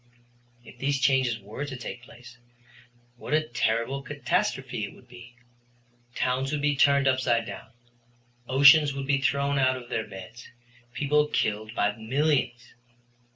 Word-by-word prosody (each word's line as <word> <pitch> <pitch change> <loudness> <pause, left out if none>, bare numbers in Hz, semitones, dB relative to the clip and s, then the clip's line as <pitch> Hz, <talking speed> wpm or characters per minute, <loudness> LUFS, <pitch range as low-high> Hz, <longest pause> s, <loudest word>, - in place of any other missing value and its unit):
If - - -15
these 140 0 0
changes 130 -3 +2
were 105 +8 -7
to 140 -3 -6
take 120 0 -7
place, 120 0 -15 0.8
what 150 - -2
a 155 0 0
terrible 120 +3 -1
catastrophe 140 - -2
it 100 - -11
would 125 - -19
be! 120 -1 -14 0.8
Towns 130 +2 -1
would 150 -1 -2
be 145 0 +2
turned 140 0 +4
upside 130 -3 +1
down, - - -9 0.8
oceans 140 +2 +6
would 135 0 -4
be 140 0 +1
thrown 140 +1 +1
out 130 -1 +2
of 120 -1 -11
their 110 - -3
beds, 95 +5 -11 0.4
people 150 +3 +1
killed 110 -3 -2
by 105 0 +1
millions. 125 0 -1
130 Hz, 145 wpm, -26 LUFS, 120-140 Hz, 0.8 s, oceans